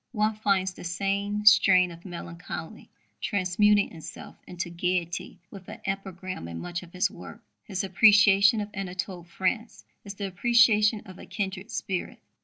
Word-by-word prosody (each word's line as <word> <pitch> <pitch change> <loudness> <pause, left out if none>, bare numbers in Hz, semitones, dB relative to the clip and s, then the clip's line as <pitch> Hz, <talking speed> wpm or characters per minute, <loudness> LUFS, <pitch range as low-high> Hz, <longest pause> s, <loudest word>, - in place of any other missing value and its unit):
One 215 -1 +1
finds 195 -3 0
the - - -11
same 200 +4 -2
strain 185 -4 +6
of 170 0 -13
melancholy 170 +2 -8 0.3
transmuting 205 0 +2
itself 160 -2 -10
into 175 -1 -5
gaiety 175 0 -2
with 190 -2 -11
an - - -9
epigram 190 - -5
in 85 0 -7
much 175 - -5
of 175 -2 -14
his 180 0 0
work. - - -11 0.3
His 195 -4 -3
appreciation 200 +2 +5
of 205 - -5
Anatole 185 -2 -5
France 190 +6 -3 0.2
is 200 -1 -8
the 200 - -4
appreciation 215 +1 +3
of 185 -2 -12
a - - -11
kindred 195 0 -4
spirit. 190 -3 -4
195 Hz, 150 wpm, -27 LUFS, 180-210 Hz, 0.3 s, strain